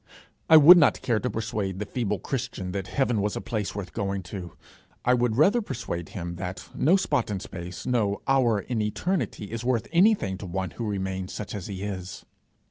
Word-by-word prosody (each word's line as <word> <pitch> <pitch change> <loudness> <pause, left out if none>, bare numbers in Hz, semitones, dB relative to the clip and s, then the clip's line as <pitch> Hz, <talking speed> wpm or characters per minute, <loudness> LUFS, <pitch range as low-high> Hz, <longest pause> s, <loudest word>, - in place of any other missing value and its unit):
I 160 - +10
would 170 +4 +10
not 145 -8 +3
care 115 -3 +1
to 125 - -2
persuade 110 -5 -3
the 105 - -3
feeble 105 -2 -2
Christian 115 -5 -4
that 95 -1 -4
heaven 125 -6 +1
was 105 +1 -1
a - - -2
place 105 -5 -3
worth 100 -3 -6
going 100 -3 -2
to; 90 -3 -6 0.5
I 125 - +5
would 120 -2 +1
rather 200 - +4
persuade 100 - -5
him 85 -2 -6
that 90 +1 -6
no 165 +7 +3
spot 130 - 0
in 100 -2 -2
space, 90 -1 -8
no 110 -5 0
hour 125 -6 +3
in 115 +2 -2
eternity 105 - -2
is 115 0 -4
worth 120 -3 0
anything 170 - +3
to 100 - -7
one 95 +1 -3
who 115 -3 -4
remains 95 -2 -3
such 105 - -6
as 100 -4 -5
he 95 -1 -5
is. 95 -3 -6
105 Hz, 200 wpm, -26 LUFS, 95-125 Hz, 0.5 s, I